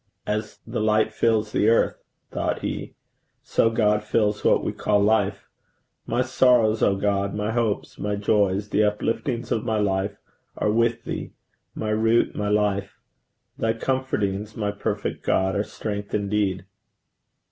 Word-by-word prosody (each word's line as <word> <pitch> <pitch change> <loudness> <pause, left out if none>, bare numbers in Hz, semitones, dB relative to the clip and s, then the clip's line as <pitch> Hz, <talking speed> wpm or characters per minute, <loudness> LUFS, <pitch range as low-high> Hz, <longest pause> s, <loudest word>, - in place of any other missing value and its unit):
'As 105 +1 -3
the - - -3
light 110 0 +2
fills 110 -1 +1
the 105 - +3
earth,' 115 - +2 0.3
thought - - -2
he, - - -4 0.5
'so 115 - +2
God 105 -2 +2
fills 105 -1 0
what - - +3
we - - -1
call 105 -1 +1
life. 100 -1 +1 0.6
My 125 - +1
sorrows, 125 -4 +3
O 100 - +3
God, 100 0 0
my 105 +1 -1
hopes, 115 -3 -1
my 105 0 -1
joys, 100 -1 +1
the 105 - 0
upliftings 115 +4 -1
of 110 - 0
my 110 - 0
life 100 0 0 0.4
are 105 - +1
with 115 +1 +1
thee, - - -5 0.4
my 110 -1 -2
root, 110 +2 +2
my 105 0 -1
life. 105 -1 0 0.6
Thy 115 0 +1
comfortings, 110 -5 -2
my 105 -2 -1
perfect 100 0 -3
God, 95 0 +1
are 100 - +1
strength 105 -1 -5
indeed!' 100 -2 0
105 Hz, 145 wpm, -24 LUFS, 100-110 Hz, 0.6 s, the